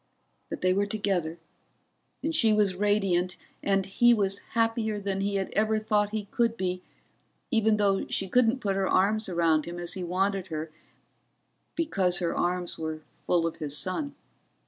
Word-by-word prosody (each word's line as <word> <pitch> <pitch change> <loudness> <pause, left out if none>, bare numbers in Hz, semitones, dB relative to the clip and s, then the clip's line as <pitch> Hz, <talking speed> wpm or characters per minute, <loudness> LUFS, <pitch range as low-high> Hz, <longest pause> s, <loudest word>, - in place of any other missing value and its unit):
But - - -5
they 185 0 +3
were 200 +2 +1
together 195 -6 -1 0.9
and 320 - -1
she 225 -9 +4
was 210 -3 +3
radiant, 190 -3 +1 0.2
and 195 -1 +1
he 240 +5 +4
was 195 -2 0 0.2
happier 225 -2 +1
than 195 -1 -2
he 200 0 -1
had 195 -1 -2
ever 220 +1 +2
thought 210 -1 +1
he 215 -1 -3
could 230 -1 +1
be, 185 -2 -2 0.7
even 220 -2 +3
though 200 -2 +1
she 195 - -1
couldn't 250 +4 +3
put 195 -2 0
her 195 -1 0
arms 215 +3 +2
around 165 -3 +2
him 175 +1 -6
as 175 0 -4
he 185 - -4
wanted 190 +2 0
her 155 -2 -4
to 160 - -21 1.0
because 195 - +1
her 170 -1 -1
arms 175 0 -1
were 160 -1 -4 0.3
full 175 -2 +3
of 165 - -3
his 150 -1 -2
son. 280 +10 -2
195 Hz, 170 wpm, -28 LUFS, 180-215 Hz, 1.0 s, she